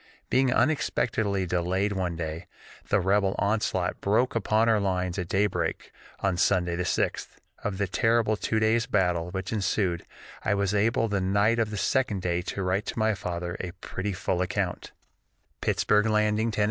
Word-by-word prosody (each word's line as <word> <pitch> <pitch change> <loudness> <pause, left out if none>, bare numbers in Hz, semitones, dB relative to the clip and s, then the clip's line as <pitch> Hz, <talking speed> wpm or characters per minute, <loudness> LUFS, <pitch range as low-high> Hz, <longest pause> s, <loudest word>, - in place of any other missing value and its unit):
Being 130 0 +3
unexpectedly 110 -9 +1
delayed 90 +3 0
one 90 -3 -2
day, 80 0 -5 0.4
the - - +3
rebel 95 +1 +2
onslaught 100 -4 0
broke 110 +6 +2
upon 110 0 +2
our 110 -2 +4
lines 90 -2 -1
at 90 - -3
day 95 +3 +2
break 105 - -3 0.3
on 95 -2 +1
Sunday 90 -2 +2
the 90 - -2
6th. - - 0 0.4
Of 100 -3 -2
the 100 - +1
terrible 115 +3 +2
two 110 +1 -1
days 110 +2 +2
battle 90 -4 +1
which 95 +3 -4
ensued, 95 -4 0 0.4
I 105 - +1
was 100 0 0
able 115 +2 +2
the 100 -2 -1
night 100 +5 +2
of 110 -2 +1
the 105 - -5
second 105 -4 0
day 85 -1 0
to 100 - -3
write 95 +4 0
to - - -4
my 110 0 +2
father 85 -2 -4
a 90 -2 -5
pretty 95 +1 -4
full 90 -1 -1
account: 90 - -2 0.7
"_Pittsburg 105 +1 +2
Landing, 105 +1 +2
Tenn. 105 - -4
100 Hz, 170 wpm, -27 LUFS, 90-110 Hz, 0.7 s, our